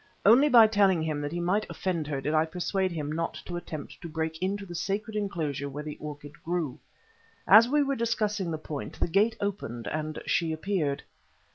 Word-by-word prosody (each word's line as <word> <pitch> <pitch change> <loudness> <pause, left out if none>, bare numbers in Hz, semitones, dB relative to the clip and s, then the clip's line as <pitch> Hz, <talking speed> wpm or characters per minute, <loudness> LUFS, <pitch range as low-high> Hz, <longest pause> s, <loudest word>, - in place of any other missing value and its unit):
Only 250 +8 +7
by 235 -4 +9
telling 200 -6 +3
him 155 -2 -2
that 145 0 -3
he 175 - -3
might 190 +5 0
offend 170 -5 -2
her 145 -2 -2
did 150 - -1
I 155 0 +4
persuade 185 +2 -1
him 150 -3 -3
not 165 +2 -2
to 175 - -5
attempt 160 -3 -7
to 170 - -7
break 160 +1 -3
into 200 +2 -1
the 175 - -9
sacred 200 +6 -3
enclosure 160 -9 -2
where 145 +2 -6
the 150 -1 -6
orchid 145 0 -9
grew. 165 -6 -2 0.7
As 220 +4 +8
we 295 +1 +3
were 275 0 0
discussing 215 -5 0
the 160 - -2
point, 155 -2 -7
the - - +2
gate 210 +6 +2
opened 190 - -3
and 155 0 -3
she 165 -2 +1
appeared. 155 -4 -1
175 Hz, 200 wpm, -28 LUFS, 155-205 Hz, 0.7 s, by